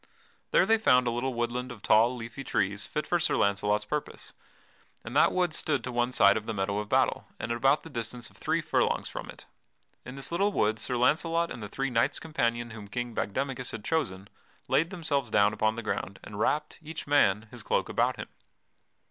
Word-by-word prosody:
There - - +4
they 225 0 +3
found 125 - +4
a 120 - +1
little 120 +2 -2
woodland 120 +2 -2
of 115 -4 -11
tall, 115 +4 +4
leafy 120 +3 -7
trees 100 -4 -1
fit 150 - -3
for 175 - +1
Sir 170 - +2
Launcelot's 105 +1 +1
purpose, 150 +5 -5 0.7
and 115 +3 -8
that 150 - +5
wood 180 -3 +1
stood 145 -5 0
to 130 - -4
one 120 +1 0
side - - +5
of 110 - -6
the 115 - -2
meadow 100 +1 -1
of 105 0 -5
battle - - +2
and - - -3
at - - +1
about 135 +5 +3
the 165 - -10
distance 120 -1 -4
of - - -24
three - - 0
furlongs - - 0
from - - -7
it. - - -11 0.6
In 125 - -9
this 135 +3 -1
little 195 +4 +2
wood 110 - +1
Sir 125 - -2
Launcelot 165 +6 +2
and 115 - -6
the 105 - -6
three 135 +4 -2
knights 120 +4 +2
companion 120 -7 -1
whom 105 -2 -9
King 120 +3 -4
Bagdemagus 130 +4 -2
had 110 -2 -7
chosen 100 - -1 0.4
laid 165 +2 +2
themselves 150 - -2
down 105 0 +4
upon 110 +1 +1
the 115 - -5
ground 100 -2 -3
and 105 -1 -8
wrapped, 150 +7 0
each 160 0 -7
man, 110 -7 +3
his - - -8
cloak - - 0
about - - +1
him. - - -7
120 Hz, 210 wpm, -28 LUFS, 110-145 Hz, 0.7 s, that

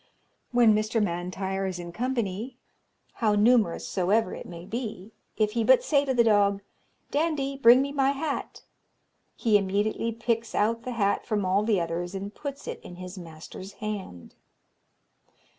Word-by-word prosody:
"When 240 -3 +5
Mr. 215 +2 +1
M'Intyre 190 +1 -2
is 185 -1 -4
in 175 -1 -7
company, 235 +1 -3 0.6
how 215 -2 +3
numerous 215 -4 +3
soever 195 +3 +1
it - - -8
may 170 0 -9
be, 220 -2 -5 0.3
if 215 -1 +2
he 230 +1 0
but 260 +3 +5
say 285 -2 +2
to 265 - 0
the 235 - +5
dog, 200 -2 +3 0.5
'Dandie, 285 -3 0
bring 250 0 +7
me 280 - -4
my 275 -1 +2
hat,' 280 +1 -3 0.7
he 215 -3 +3
immediately 205 +4 -1
picks 230 0 -2
out 230 +2 +1
the 250 - -3
hat 200 -3 0
from 210 -4 0
all 190 +2 +2
the 210 -3 +2
others, 175 +2 -3
and 200 +2 -5
puts 285 -1 -7
it - - -5
in 175 - -10
his 180 +1 -8
master's 170 +3 -10
hand. 200 - -6
215 Hz, 160 wpm, -27 LUFS, 190-240 Hz, 0.7 s, bring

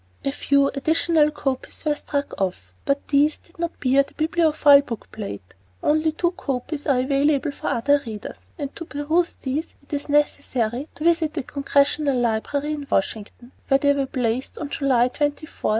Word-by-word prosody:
A 275 - +1
few 280 0 +2
additional 315 +2 +2
copies 270 0 -4
were 300 - +3
struck 285 -6 -4
off, 95 - -3
but 280 0 -1
these 295 +2 +3
did 340 +1 -25
not 340 0 -3
bear 270 +1 +4
the 275 - -8
Bibliophile 310 -3 +5
book 235 -6 -7
plate. 100 - -7 0.3
Only 310 +1 +2
two 345 +2 0
copies 295 -4 -4
are 265 -3 +3
available 280 +2 +1
for - - -7
other 285 +5 +2
readers, 215 -2 -7 0.2
and 285 -3 -5
to 335 - -6
peruse 315 +4 0
these 285 +5 -4
it 280 - -13
is 285 +1 -3
necessary 285 -3 0
to 300 - -7
visit 330 -2 +2
the 300 - -2
Congressional 280 0 +1
Library 245 +5 0
in 290 -2 -4
Washington, 220 +5 -2 0.2
where 270 - +5
they 285 +1 +3
were 275 -1 -1
placed 250 0 -2
on 290 - -5
July 260 -4 +2
24, 290 +4 0 0.2
1908. - - -16
285 Hz, 175 wpm, -23 LUFS, 260-305 Hz, 0.3 s, Bibliophile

